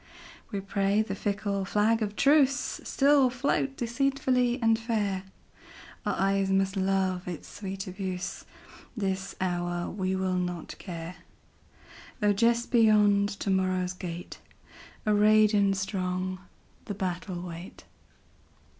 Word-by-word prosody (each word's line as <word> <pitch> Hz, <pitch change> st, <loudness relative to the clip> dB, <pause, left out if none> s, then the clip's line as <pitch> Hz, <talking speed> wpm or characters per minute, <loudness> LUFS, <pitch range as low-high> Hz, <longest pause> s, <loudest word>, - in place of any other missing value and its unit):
We 200 Hz, -2 st, -2 dB
pray 200 Hz, +2 st, +1 dB
the 200 Hz, -, -4 dB
fickle 200 Hz, 0 st, -2 dB
flag 210 Hz, +4 st, +2 dB
of 210 Hz, -1 st, -2 dB
truceStill 275 Hz, -1 st, +3 dB
float 270 Hz, +1 st, -1 dB
deceitfully 255 Hz, 0 st, +1 dB
and 225 Hz, -2 st, +3 dB
fair; 205 Hz, -5 st, -1 dB, 0.8 s
Our -, -, +1 dB
eyes 195 Hz, 0 st, +1 dB
must 195 Hz, 0 st, +1 dB
love 190 Hz, -1 st, 0 dB
its 175 Hz, -3 st, -6 dB
sweet 195 Hz, -1 st, -6 dB
abuse; 185 Hz, -1 st, -5 dB, 0.5 s
This 195 Hz, -1 st, -2 dB
hour 175 Hz, -1 st, -2 dB
we 190 Hz, -1 st, -1 dB
will 185 Hz, -1 st, 0 dB
not 180 Hz, -2 st, -4 dB
care, 170 Hz, -2 st, -7 dB, 1.0 s
Though 205 Hz, -1 st, +3 dB
just 235 Hz, +3 st, +2 dB
beyond 210 Hz, -3 st, +5 dB
to 195 Hz, -, 0 dB
morrow's 185 Hz, -1 st, +1 dB
gate, 175 Hz, -1 st, -7 dB, 0.7 s
Arrayed 215 Hz, 0 st, +5 dB
and 200 Hz, -1 st, +3 dB
strong, 185 Hz, -1 st, -2 dB, 0.5 s
the 205 Hz, -, -4 dB
battle 180 Hz, -1 st, -3 dB
wait. 175 Hz, +1 st, -9 dB
195 Hz, 115 wpm, -28 LUFS, 185-220 Hz, 1.0 s, beyond